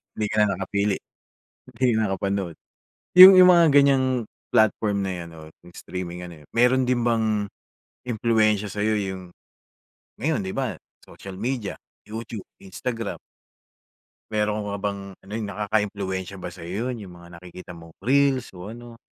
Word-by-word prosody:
Hindi 105 -1 -1
ka - - -3
na 100 -2 -1
nakapili. 100 +1 -1 0.8
Hindi 125 -3 +2
ka - - +1
nakapanood. 95 -2 -2 0.6
'Yong, 190 +1 +13
'yong 180 0 +8
mga 170 -2 +7
ganyang 140 -2 +5 0.5
platform 105 -2 +2
na 95 - -2
‘yan 85 -1 -7
‘no, 80 - -12 0.2
‘yong 90 - -16
streaming 90 -1 -6
ano 85 -4 -12
eh, - - -20
meron 125 +2 +4
din 125 -1 +1
bang 110 -3 +1 0.6
impluwensya 110 -3 +1
sa 105 - -5
iyo 110 0 +2
'yong 95 -2 -3 1.0
ngayon 150 -5 0
‘di 95 - -4
ba, - - -3 0.2
social 95 -1 -11
media, 115 +1 -3 0.3
YouTube, 110 -1 -7 0.2
Instagram, 115 +3 -5 1.1
meron 105 -1 -1
ka 100 0 -4
bang 100 -1 -2 0.2
ano, 95 - -17
'yong 110 -2 -3
nakakaimpluwensya 100 -2 -2
ba 90 - -6
sa 90 - -12
iyo 105 +8 -3
‘yon, 115 -3 -7
‘yong 90 - -12
mga 85 0 -15
nakikita 90 0 -11
mong 80 -1 -13
reels 135 -1 +2
o 90 +3 -9
ano? 120 0 -11
105 Hz, 155 wpm, -24 LUFS, 95-115 Hz, 1.1 s, Yong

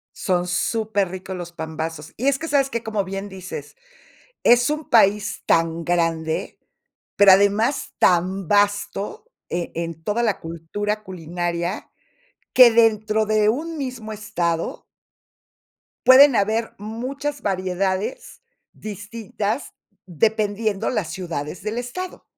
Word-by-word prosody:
Son 180 -2 0
superricos 190 -1 -1
los 175 -1 -7
pambazos. 160 -1 -6
Y 255 - -1
es 275 -1 +2
que, 325 - -4
¿sabes 280 -3 +2
qué? 235 -3 -3
Como 215 -2 -1
bien 195 +1 -5
dices, 190 -1 -8 0.7
es 245 +3 +5
un 305 0 -3
país 210 -4 +3
tan 165 0 +1
grande, 165 -2 -1 0.6
pero 200 -1 +8
además 205 +7 +2
tan 185 +1 +2
vasto 205 - 0 0.2
e 175 0 -3
en 165 -1 -5
toda 210 +6 -1
la 215 -4 0
cultura 190 +6 -4
culinaria, 175 0 -4 0.6
que 250 -2 +9
dentro 220 -1 +3
de 215 0 +3
un 320 +8 -2
mismo 250 -6 -5
estado 175 -6 -2 1.2
pueden 265 +1 +8
haber 220 +3 0
muchas 265 +7 -5
variedades 190 - -2 0.3
distintas, 215 +2 -5 0.3
dependiendo 210 +3 0
las 195 -10 -2
ciudades 165 -3 -5
del 215 +2 -4
estado. 355 +10 -5
205 Hz, 115 wpm, -22 LUFS, 175-230 Hz, 1.2 s, que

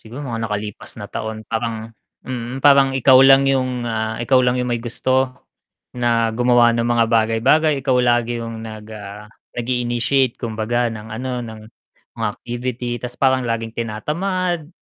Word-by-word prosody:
siguro 125 +6 -9
mga 115 -3 -3
nakalipas 105 +1 -5
na 105 -1 -8
taon. 110 0 -5
Parang 115 -1 -4 0.3
mm, 125 +1 -5
parang 140 -1 +6
ikaw 130 0 +6
lang 135 0 +7
'yong, 130 -2 0
ah, 110 -1 -2
ikaw 130 +1 +4
lang 125 0 +2
'yong 125 -1 -1
may 120 -1 -1
gusto 130 +2 0 0.6
na 115 -1 +2
gumawa 120 -1 +4
ng 115 - 0
mga 120 -1 +3
bagay-bagay. 115 +8 +3
Ikaw 130 -1 +1
lagi 120 -1 +1
'yong 115 -1 -6
nag 110 -1 -8
ah, 105 0 -9 0.3
nag-i-initiate 120 +1 0
kumbaga 115 +1 -1
ng, 110 0 -8
ano, 125 +4 -4
ng 110 -2 -8 0.6
mga 115 -2 0
activity 120 0 -5
'tas 125 +1 -6
parang 130 -1 +2
laging 115 -1 -2
tinatamad. 165 - -2
120 Hz, 155 wpm, -20 LUFS, 115-130 Hz, 0.6 s, lang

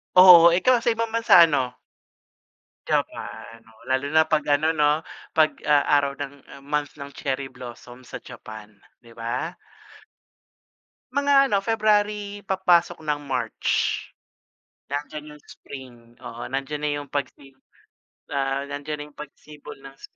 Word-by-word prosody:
Oo, 180 -2 +10
ikaw 245 +6 +3
sa 230 -1 0
ibang 230 0 -2
bansa, 230 -6 +6
ano? 130 -6 0 1.2
Japan, 115 0 -3
oh, 110 - -23
lalo 130 +1 +1
na 160 0 +6
'pag 155 -1 +2
ano, 155 +2 +1
'no, 150 0 +5 0.4
'pag, 155 -1 +5 0.2
ah, 145 -1 +4
araw 140 -1 0
ng, 140 0 -5 0.2
ah, 140 - -13
month 150 -1 -1
ng 140 0 -8
cherry 135 -1 -3
blossom 125 0 -11
sa - - -7
Japan, 110 -3 -10 0.3
'di 115 - -17
ba? 125 +9 -4 1.6
Mga 285 0 +2 0.2
ano, 200 - +2
February, 210 -1 0
papasok 175 -4 +1
ng 150 -1 -1
March. 130 -2 -4 1.3
Nandiyan 150 +1 -5
yung 150 - -21
spring, 130 -3 -11 0.2
oo, 120 -1 -9
nandiyan 135 +2 -3
na 150 - 0
yung 145 - -10
pagsi 140 -1 -5 0.8
ah, 135 0 -1
nandiyan 145 +1 -5
na 145 - -6
yung - - -35
pagsibol 150 0 -12
ng 135 0 -13
sp - - -15
145 Hz, 140 wpm, -24 LUFS, 135-175 Hz, 1.6 s, Oo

